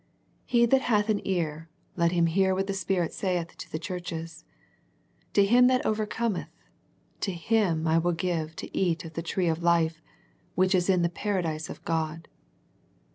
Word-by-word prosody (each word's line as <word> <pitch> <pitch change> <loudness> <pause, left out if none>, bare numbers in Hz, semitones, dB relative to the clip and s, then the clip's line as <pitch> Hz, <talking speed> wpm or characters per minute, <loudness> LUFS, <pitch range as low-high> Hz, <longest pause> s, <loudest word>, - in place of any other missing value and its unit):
He 235 -1 +4
that 265 +3 +4
hath 215 -4 +1
an 210 -2 +1
ear, 165 -4 -2 0.3
let 170 -1 +2
him 170 -1 +3
hear 190 +3 +2
what 195 +1 0
the 195 - -2
Spirit 190 -3 -1
saith 180 -3 -2
to - - -9
the - - -2
churches. 165 -1 -6 0.9
To 200 - +5
him 245 +4 +6
that 255 0 +2
overcometh, 215 -1 -1 0.7
to 195 - -1
him 175 -2 +1
will 165 +1 +2
I - - +1
give 165 -3 -2
to - - -8
eat 170 -3 0
of 160 - -9
the 165 - -3
tree 175 +2 -1
of 165 0 0
life, 165 -2 +2 0.5
which 185 +1 +3
is 180 0 +2
in 180 -2 +3
the 170 - +2
Paradise 170 -4 -2
of - - -9
God." 160 0 -2
175 Hz, 175 wpm, -27 LUFS, 165-195 Hz, 0.9 s, him